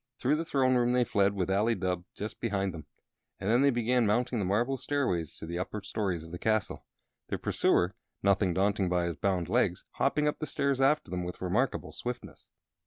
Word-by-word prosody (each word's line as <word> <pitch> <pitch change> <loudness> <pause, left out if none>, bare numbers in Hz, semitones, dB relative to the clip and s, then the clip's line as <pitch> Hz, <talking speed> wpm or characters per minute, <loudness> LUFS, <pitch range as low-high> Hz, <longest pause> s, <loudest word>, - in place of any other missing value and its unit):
Through 140 +4 +2
the 165 - -2
throne 130 -4 +2
room 125 -1 +3
they 125 0 +4
fled, 100 -3 +2
with 95 -1 -1
Ali 105 +4 +2
Dubh 90 -2 -2
just 105 +2 -6
behind 100 -5 -1
them, 80 -2 -9 0.5
and 95 - -4
then 120 +4 +4
they 140 - +5
began 120 -1 +2
mounting 120 +3 +1
the 100 - 0
marble 115 +8 +1
stairways 125 - -1
to - - -7
the 85 +2 -4
upper 100 +2 -4
stories 95 -5 -2
of 80 - -11
the 90 - -6
castle. 110 -3 -1 0.4
Their - - -2
pursuer, 90 +3 +2 0.3
nothing 100 -1 +3
daunted 100 -1 +1
by 90 -1 +1
his 85 -2 -3
bound 95 -5 0
legs, - - +1
hopped - - 0
up 150 0 0
the 155 - -3
stairs 140 -2 0
after 140 - +2
them 90 -1 -2
with 90 0 -6
remarkable 100 +9 0
swiftness. 120 0 -7
105 Hz, 205 wpm, -30 LUFS, 90-125 Hz, 0.5 s, they